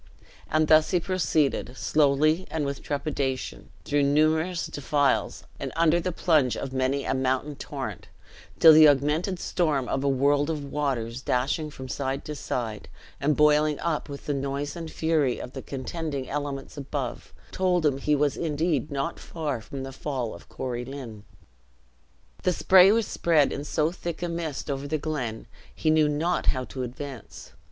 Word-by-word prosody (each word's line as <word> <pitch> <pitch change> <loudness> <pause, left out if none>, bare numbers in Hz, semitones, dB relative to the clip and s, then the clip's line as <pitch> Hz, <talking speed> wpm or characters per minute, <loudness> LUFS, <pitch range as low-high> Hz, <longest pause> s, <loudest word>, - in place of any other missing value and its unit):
And 155 0 +2
thus 155 0 +5
he 180 - +2
proceeded, 160 -8 0
slowly 155 +4 +2
and 155 -2 -2
with 140 0 -4
trepidation, 140 - -3 0.2
through 145 0 +1
numerous 155 +5 +2
defiles, 145 0 0 0.2
and - - -4
under 165 +1 +4
the 180 +1 -2
plunge 155 -7 +2
of 135 - -5
many 135 +1 0
a - - 0
mountain 130 +2 -1
torrent, - - -6 0.5
till 160 -1 +9
the 155 0 +9
augmented 150 +7 +2
storm 150 -8 0
of 135 - -1
a 140 - +2
world 140 +2 +2
of 150 -3 -3
waters, 130 -5 -2
dashing 140 +5 0
from 130 -3 -9
side 135 +1 -3
to 150 - -4
side, 115 -7 -4 0.3
and 145 +1 +1
boiling 150 0 +4
up 160 -3 -2
with 140 0 -8
the 145 - -1
noise 140 +1 -3
and 165 -2 -6
fury 155 -7 +1
of 125 - -8
the 135 - -6
contending 140 0 -4
elements 145 -1 -4
above, 140 -2 -5 0.2
told 180 -3 +1
him 140 -2 +2
he 150 +2 +2
was 145 -1 +1
indeed 155 -3 -1
not 140 +3 -3
far 150 -8 -4
from 135 +4 -7
the 135 0 -7
fall 130 -5 -3
of 85 - -13
Corie 125 -2 -4
Lynn. 120 -6 -8 1.2
The 180 - +1
spray 190 +2 +6
was 225 0 +2
spread 160 -7 +2
in 140 - -4
so 155 +2 0
thick 175 -1 -5
a - - 0
mist 165 -4 -3
over 140 +1 -4
the 155 +2 0
glen, 135 -8 -4 0.3
he 155 - +1
knew 155 -1 +4
not 165 +4 0
how 130 -1 +2
to 130 +1 -6
advance. 130 0 -8
145 Hz, 170 wpm, -26 LUFS, 135-155 Hz, 1.2 s, till